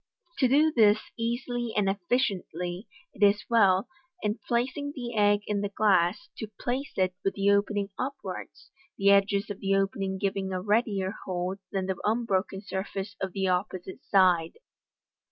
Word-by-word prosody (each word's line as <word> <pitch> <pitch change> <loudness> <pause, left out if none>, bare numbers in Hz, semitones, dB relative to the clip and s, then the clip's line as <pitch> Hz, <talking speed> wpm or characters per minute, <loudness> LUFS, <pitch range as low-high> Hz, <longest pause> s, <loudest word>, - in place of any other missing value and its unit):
To 260 - +5
do 300 +5 +4
this 215 -3 +6 0.2
easily 240 0 -2
and 205 -2 +2
effectually, 195 -3 -1 0.3
it - - -15
is 205 0 +4
well, 200 -2 +4 0.4
in 210 +2 -1
placing 265 +4 -1
the 240 -3 -5
egg 205 -1 +4
in 205 -1 -1
the 205 - -2
glass, 200 - +2
to 220 - -5
place 265 +4 -3
it 185 -1 +2
with 195 - 0
the 200 0 +3
opening 200 0 +1
upwards, 275 +2 -6 0.3
the 200 0 +4
edges 200 +1 +3
of 200 - -6
the 195 0 +1
opening 195 0 -1
giving 195 -1 -2
a 185 - -1
readier 205 -1 0
hold 185 +1 -3
than 190 -1 -1
the 190 -1 -2
unbroken 200 -4 0
surface 195 +1 -4
of 190 -2 -3
the 190 -1 0
opposite 185 0 -2
side. 180 -4 +4
200 Hz, 155 wpm, -28 LUFS, 190-225 Hz, 0.4 s, this